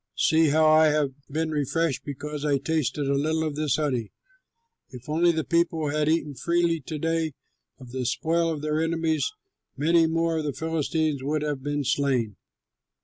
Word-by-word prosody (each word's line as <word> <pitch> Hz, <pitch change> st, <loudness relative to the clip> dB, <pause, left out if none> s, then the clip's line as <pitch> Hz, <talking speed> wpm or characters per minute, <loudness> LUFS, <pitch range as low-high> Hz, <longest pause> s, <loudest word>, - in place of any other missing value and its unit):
See 160 Hz, +1 st, +4 dB
how 155 Hz, +2 st, +3 dB
I 155 Hz, 0 st, +6 dB
have 150 Hz, -2 st, +1 dB, 0.2 s
been 160 Hz, +2 st, -1 dB
refreshed 155 Hz, +1 st, 0 dB
because 150 Hz, +1 st, -6 dB
I 145 Hz, -2 st, +2 dB
tasted 145 Hz, -1 st, -1 dB
a 140 Hz, -, +2 dB
little 155 Hz, +3 st, 0 dB
of 155 Hz, -2 st, -2 dB
this 150 Hz, -2 st, +1 dB
honey. 130 Hz, -8 st, -1 dB, 0.8 s
If 125 Hz, -1 st, -11 dB
only 165 Hz, +3 st, +3 dB
the 160 Hz, -1 st, -1 dB
people 170 Hz, -2 st, +1 dB
had 150 Hz, 0 st, +1 dB
eaten 155 Hz, -2 st, 0 dB
freely 170 Hz, +3 st, +1 dB
to 155 Hz, -, -3 dB
day 165 Hz, 0 st, -1 dB, 0.4 s
of 125 Hz, -3 st, -12 dB
the 130 Hz, -1 st, -2 dB
spoil 165 Hz, +4 st, +1 dB
of 150 Hz, -2 st, -5 dB
their 155 Hz, +1 st, 0 dB
enemies, 165 Hz, -, 0 dB, 0.5 s
many 165 Hz, +3 st, +4 dB
more 165 Hz, 0 st, 0 dB
of -, -, -3 dB
the 145 Hz, -, -2 dB
Philistines 160 Hz, -2 st, -1 dB
would 150 Hz, +2 st, -1 dB
have 145 Hz, -3 st, -2 dB
been 145 Hz, +1 st, -2 dB
slain." 125 Hz, -6 st, 0 dB
155 Hz, 175 wpm, -26 LUFS, 145-160 Hz, 0.8 s, I